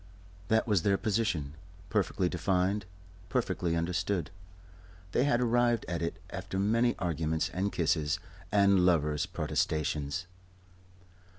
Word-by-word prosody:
That 110 0 +3
was 105 -6 +3
their 100 +2 +2
position, 95 -10 -1 0.4
perfectly 95 -2 +1
defined, 95 +2 0 0.4
perfectly 85 -2 0
understood. 85 +1 -1 0.8
They 125 - +2
had 145 -4 +3
arrived 120 -1 +2
at 85 -1 -2
it 85 - -2
after 95 +1 -5
many 115 +5 +2
arguments 80 0 -1
and 95 +3 -1
kisses 80 -3 +1 0.3
and 100 -2 +5
lovers' 75 -3 +2
protestations. 75 -1 -1
90 Hz, 110 wpm, -30 LUFS, 80-105 Hz, 0.8 s, and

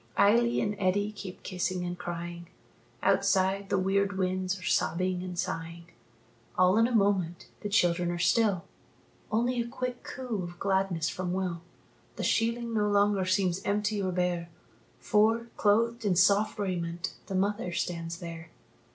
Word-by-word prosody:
Eily 235 +4 +4
and 210 0 -1
Eddie 205 +2 +1
keep 195 -3 -9
kissing 180 -1 -2
and 175 0 -3
crying 170 0 -6 0.6
Outside, 195 0 +2
the - - +2
weird 195 +1 +1
winds 185 0 -1
are - - -12
sobbing 180 +3 0
and 180 -1 -6
sighing. 170 0 -4 0.7
All 185 +3 +5
in 230 - +5
a - - -4
moment 195 -6 +1
the 205 - -4
children 175 -3 +2
are 175 - -2
still, 185 +1 +2 0.7
Only 240 +3 +1
a 235 - -4
quick 250 +1 -4
coo 245 -6 -4
of 175 0 -7
gladness 190 -4 +1
from 180 -1 -3
Will. 180 -3 -2 0.5
The - - -4
sheeling 230 0 0
no 210 -1 +2
longer 200 -1 +3
seems 185 0 +1
empty 210 +1 0
or 185 -1 -1
bare, 175 -1 -1 0.5
For, 220 - +2
clothed 230 +3 +2
in 200 -4 +2
soft 200 +4 +3
raiment, 175 -3 -3
the 195 - -3
mother 200 0 0
stands 170 -1 -3
there. 165 -1 -8
190 Hz, 150 wpm, -29 LUFS, 175-210 Hz, 0.7 s, All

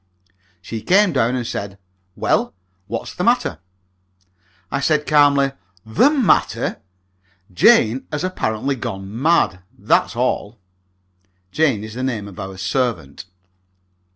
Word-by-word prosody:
She 110 +3 -6
came 195 - +3
down 125 -2 +1
and 125 -2 -3
said, 100 -3 -5 0.4
"Well, - - 0 0.3
what's - - -5
the - - -3
matter?" - - +1 1.1
I - - -1
said, 150 +1 +1
calmly, 140 -2 +4 0.3
"The 110 - +4
matter? 275 -8 +1 0.7
Jane 110 +7 +4
has 150 +2 -3
apparently 135 -7 -2
gone 110 -2 -6
mad, 145 - +2 0.2
that's - - +1
all." 105 +4 -1 0.9
(Jane 135 -10 +1
is 110 0 -8
the 125 - -5
name 115 -6 -3
of 95 -3 -11
our 95 0 -7
servant.) 95 - -2
120 Hz, 120 wpm, -20 LUFS, 105-145 Hz, 1.1 s, calmly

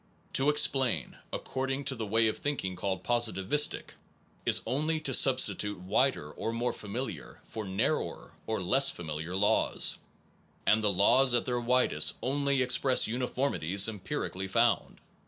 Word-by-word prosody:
To 135 +2 +2
explain, 135 - +1 0.2
according 135 +1 -4
to 135 -1 -3
the 110 -3 -5
way 110 +2 +2
of 110 - -3
thinking 115 -11 -3
called 95 0 -4
positivistic, 120 +4 +1 0.6
is - - +4
only 155 +4 -1
to 135 - -2
substitute 105 -6 +3
wider 90 - -1
or 115 - -5
more 120 +2 -2
familiar, 105 - -7
for 110 -1 -8
narrower 95 0 -3
or 110 -4 -3
less 135 +10 +4
familiar 80 +1 -6
laws, 100 +2 +1 0.7
and 110 +1 +2
the 105 - +2
laws 120 +7 +3
at 120 - 0
their 125 -1 -2
widest 125 +2 +3
only 140 0 0
express 130 +1 +4
uniformities 115 - 0
empirically 95 -2 -5
found. 115 +3 0
115 Hz, 140 wpm, -29 LUFS, 95-135 Hz, 0.7 s, is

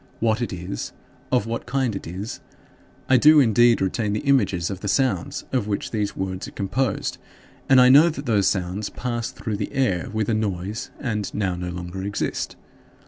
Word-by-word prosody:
What 110 +1 +1
it 120 - -2
is? 90 +1 -5 0.4
Of 125 -5 +2
what 115 +1 -4
kind 125 -4 0
it 95 - -6
is?" 95 +6 -6 0.7
I 130 - +5
do 150 +4 +7
indeed 120 -3 +4
retain 105 +2 -1
the 105 - -1
images 100 -11 +2
of 95 - -5
the 100 - -5
sounds 135 +4 0
of 125 -6 0
which 100 -1 -2
these 105 -2 -2
words 95 0 -3
are - - -9
composed 105 +3 -1 0.5
and 135 -1 +7
I 125 0 +7
know 145 +6 +8
that 145 -3 -6
those 105 -5 +2
sounds 95 +2 -1
pass 120 -2 -3
through 105 -2 -4
the 100 - -4
air 125 -11 0
with 110 -1 -1
a 115 - +1
noise 105 0 -2
and 105 -6 -2
now 100 -3 0
no 90 0 -4
longer 90 +2 -6
exist. 100 +1 -3
105 Hz, 190 wpm, -23 LUFS, 95-125 Hz, 0.7 s, know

